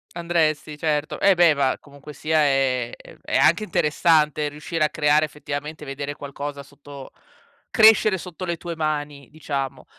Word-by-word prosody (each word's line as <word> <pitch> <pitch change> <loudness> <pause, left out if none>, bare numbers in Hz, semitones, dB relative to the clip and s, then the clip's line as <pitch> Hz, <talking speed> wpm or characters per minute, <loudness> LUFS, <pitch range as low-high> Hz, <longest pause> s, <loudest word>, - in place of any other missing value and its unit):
Andresti 160 -3 -1
certo. 150 -1 -2
Eh 195 -1 +5
beh, 170 -3 +5
ma 135 -2 0
comunque 140 +1 -14
sia 155 +1 0
è 135 -4 +1 0.3
è - - -1
anche 170 +7 +4
interessante 155 -4 +1
riuscire 155 +2 -3
a 150 - +2
creare 150 0 +2
effettivamente 150 +1 -7
vedere 140 +1 -5
qualcosa 140 0 -7
sotto 140 -1 -13 0.6
crescere 215 -2 +5
sotto 180 0 -9
le 170 -2 -2
tue 170 0 -6
mani, 150 -3 -3
diciamo. 140 -4 -5
150 Hz, 145 wpm, -23 LUFS, 140-160 Hz, 0.6 s, Eh